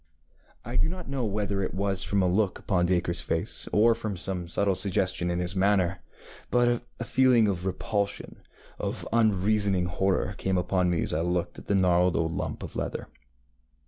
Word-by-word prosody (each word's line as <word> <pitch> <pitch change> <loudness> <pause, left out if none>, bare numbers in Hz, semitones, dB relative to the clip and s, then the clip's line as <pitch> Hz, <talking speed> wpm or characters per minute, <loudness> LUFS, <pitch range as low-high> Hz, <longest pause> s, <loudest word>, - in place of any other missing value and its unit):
ŌĆØ 75 0 -35 0.2
I - - -4
do - - +2
not 180 0 -6
know 135 -3 -1
whether 100 -1 -1
it 95 - -3
was 95 -1 -1
from 100 -1 +1
a - - +3
look 95 +1 +1
upon 90 -3 +1
DacreŌĆÖs 85 -1 0
face, 80 - -3
or 115 +3 +5
from 110 -4 -4
some 90 -1 -4
subtle 100 +3 +1
suggestion 95 -2 0
in 85 - -1
his 90 +2 -2
manner, 95 -2 +2 0.5
but 120 -1 +2 0.2
a - - -2
feeling 125 -4 +4
of 95 -2 -2
repulsion, 100 +2 -2 0.4
of - - -3
unreasoning 100 -3 +2
horror, 95 +2 0
came 95 -1 0
upon 90 0 +1
me 85 -2 +1
as - - -2
I 80 - +1
looked 90 0 -1
at - - -15
the 100 - +2
gnarled 90 -2 +3
old 80 +3 0
lump - - -4
of - - -8
leather. - - -4
95 Hz, 185 wpm, -27 LUFS, 90-105 Hz, 0.5 s, or